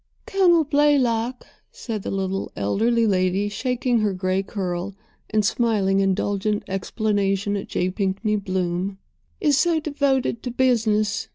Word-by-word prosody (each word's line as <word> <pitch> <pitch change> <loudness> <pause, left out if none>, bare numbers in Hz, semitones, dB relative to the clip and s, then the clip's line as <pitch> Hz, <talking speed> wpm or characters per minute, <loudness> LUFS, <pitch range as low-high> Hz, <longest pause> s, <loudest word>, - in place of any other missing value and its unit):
"Colonel 355 -4 +4
Blaylock," 260 -5 +1 0.3
said 220 -4 -5
the - - -5
little 195 0 -2
elderly 225 - +1
lady, 190 0 +1
shaking 250 +3 0
her 210 -2 +1
gray 185 +1 0
curl 190 -1 -4 0.3
and 215 -1 +1
smiling 200 -4 +1
indulgent 200 +2 0
explanation 200 0 -1
at 200 - -4
J. 180 +1 -1
Pinkney 200 +2 -1
Bloom, 185 -1 -2 0.4
"is 290 -3 +3
so 340 -2 +2
devoted 280 -6 0
to 250 - -4
businesss. 225 -5 +1
210 Hz, 125 wpm, -23 LUFS, 195-245 Hz, 0.4 s, Colonel